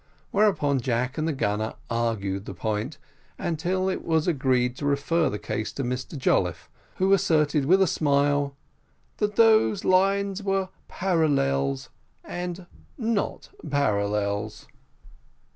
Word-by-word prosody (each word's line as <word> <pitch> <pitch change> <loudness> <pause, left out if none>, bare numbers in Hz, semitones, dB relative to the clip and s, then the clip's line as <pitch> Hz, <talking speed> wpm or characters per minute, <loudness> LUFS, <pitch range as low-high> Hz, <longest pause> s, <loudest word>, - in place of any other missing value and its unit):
Whereupon 190 -10 +2
Jack 125 +3 -1
and 155 - 0
the - - +1
gunner 110 -5 -1
argued 110 -4 -2
the 95 - -7
point, 110 - -3 0.4
until 180 +3 -1
it 190 - -2
was 160 -1 +1
agreed 130 -6 +1
to 145 - -4
refer 145 +2 +1
the 105 - -3
case 105 +1 -4
to 135 - -3
Mr 125 +4 -4
Jolliffe, 130 - 0 0.2
who 190 +1 +3
asserted, 150 -6 +2
with 190 +6 +5
a - - +4
smile, 145 -3 +1 0.6
that 210 -1 -1
those 220 -3 +4
lines 195 +1 +2
were 195 -1 0 0.2
parallels 105 - 0 0.3
and 175 0 -5 0.3
not 225 -5 -2 0.2
parallels. 105 -5 -1
145 Hz, 125 wpm, -25 LUFS, 115-185 Hz, 0.6 s, with